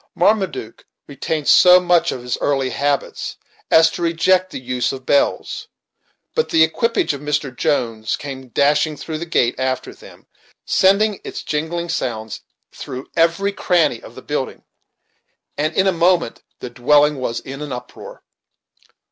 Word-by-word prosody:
Marmaduke 190 Hz, -, 0 dB, 0.2 s
retained 145 Hz, +1 st, -4 dB
so 180 Hz, 0 st, +7 dB
much 175 Hz, -1 st, +2 dB
of 125 Hz, -, -6 dB
his 125 Hz, 0 st, -2 dB
early 135 Hz, -2 st, 0 dB
habits 140 Hz, +2 st, -2 dB, 0.3 s
as 160 Hz, 0 st, +5 dB
to -, -, -7 dB
reject 180 Hz, +2 st, +2 dB
the -, -, -6 dB
use 125 Hz, -1 st, -2 dB
of 130 Hz, -1 st, -8 dB
bells, 285 Hz, +1 st, 0 dB, 0.7 s
but 470 Hz, -, 0 dB
the 160 Hz, -, +5 dB
equipage 230 Hz, +4 st, +1 dB
of 140 Hz, -, -7 dB
Mr. 145 Hz, -3 st, -2 dB
Jones 115 Hz, -8 st, -1 dB
came 135 Hz, -3 st, -8 dB
dashing 145 Hz, +4 st, +1 dB
through 155 Hz, -1 st, -5 dB
the 170 Hz, -, -6 dB
gate 120 Hz, -7 st, +2 dB
after 130 Hz, -1 st, -2 dB
them, -, -, -16 dB, 0.4 s
sending 200 Hz, +2 st, +3 dB
its -, -, -7 dB
jingling 160 Hz, +3 st, -3 dB
sounds 110 Hz, -6 st, -3 dB, 0.3 s
through 130 Hz, +1 st, -8 dB
every 170 Hz, +5 st, +2 dB
cranny 170 Hz, -, +1 dB
of -, -, -13 dB
the -, -, -11 dB
building, -, -, -4 dB, 0.9 s
and 155 Hz, +3 st, -1 dB
in 190 Hz, -, +3 dB
a 190 Hz, -, +4 dB
moment 170 Hz, -6 st, +1 dB, 0.2 s
the 125 Hz, -, -6 dB
dwelling 145 Hz, +4 st, +3 dB
was 120 Hz, -2 st, -3 dB
in 135 Hz, +2 st, -9 dB
an 150 Hz, -2 st, -6 dB
uproar. 125 Hz, 0 st, -9 dB
150 Hz, 150 wpm, -19 LUFS, 130-175 Hz, 0.9 s, so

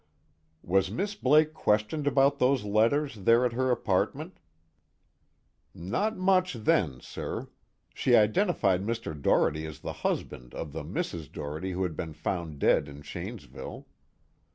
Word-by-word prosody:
"Was 95 Hz, +1 st, +2 dB
Miss 200 Hz, -, -2 dB
Blake 155 Hz, -3 st, +3 dB
questioned 110 Hz, +4 st, 0 dB
about 140 Hz, 0 st, +3 dB
those 130 Hz, -2 st, +3 dB
letters, 115 Hz, +7 st, +2 dB
there 115 Hz, +4 st, +5 dB
at 120 Hz, -, 0 dB
her 130 Hz, +2 st, 0 dB
apartment?" 125 Hz, -, -1 dB, 1.4 s
"Not 200 Hz, -, -1 dB
much 185 Hz, -1 st, +3 dB
then, 85 Hz, -, +1 dB
sir. -, -, -6 dB, 0.4 s
She 125 Hz, -, +3 dB
identified 105 Hz, -, +3 dB
Mr. 115 Hz, -5 st, -3 dB
Doherty 75 Hz, +2 st, +2 dB
as 80 Hz, -, -10 dB
the -, -, -4 dB
husband -, -, -3 dB
of 75 Hz, -, -5 dB
the -, -, -5 dB
Mrs. 80 Hz, -5 st, -4 dB
Doherty 75 Hz, +6 st, -5 dB
who 95 Hz, +1 st, -1 dB
had 85 Hz, -4 st, -2 dB
been 80 Hz, 0 st, -5 dB
found 80 Hz, -1 st, -3 dB
dead 70 Hz, -, +3 dB
in 70 Hz, +1 st, -11 dB
Shanesville. -, -, -8 dB
110 Hz, 135 wpm, -28 LUFS, 85-140 Hz, 1.4 s, there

